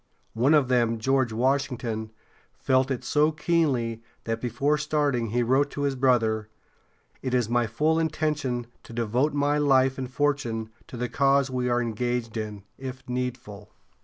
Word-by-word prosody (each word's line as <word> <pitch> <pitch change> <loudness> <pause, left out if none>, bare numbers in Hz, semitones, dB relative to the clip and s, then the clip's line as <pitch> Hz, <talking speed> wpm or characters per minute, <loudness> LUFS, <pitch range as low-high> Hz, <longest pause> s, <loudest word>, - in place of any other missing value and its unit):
One 130 +7 +4
of 145 -4 +3
them, 120 -2 +2
George 130 +1 +1
Washington, 120 -2 -1 0.5
felt 130 0 +2
it 130 -3 -2
so 150 +1 +2
keenly 145 -8 0 0.2
that 115 0 -3
before 135 +5 0
starting 145 -6 0
he 120 +3 +1
wrote 135 +4 +2
to 145 - -4
his 140 -1 +1
brother: 115 -5 +2 0.7
"It 130 -1 -1
is 120 -3 +2
my 120 -1 +2
full 155 +8 +1
intention 150 -6 -1 0.2
to - - -13
devote 120 +6 0
my 145 +1 +2
life 135 -2 +3
and 130 -1 -4
fortune 125 -6 -1 0.2
to 125 - -8
the 125 +1 -1
cause 140 0 +2
we 125 -1 -1
are 120 0 +2
engaged 120 0 -2
in, 105 -3 -5 0.2
if 130 0 -7
needful." 125 -5 -5
125 Hz, 160 wpm, -26 LUFS, 115-140 Hz, 0.7 s, One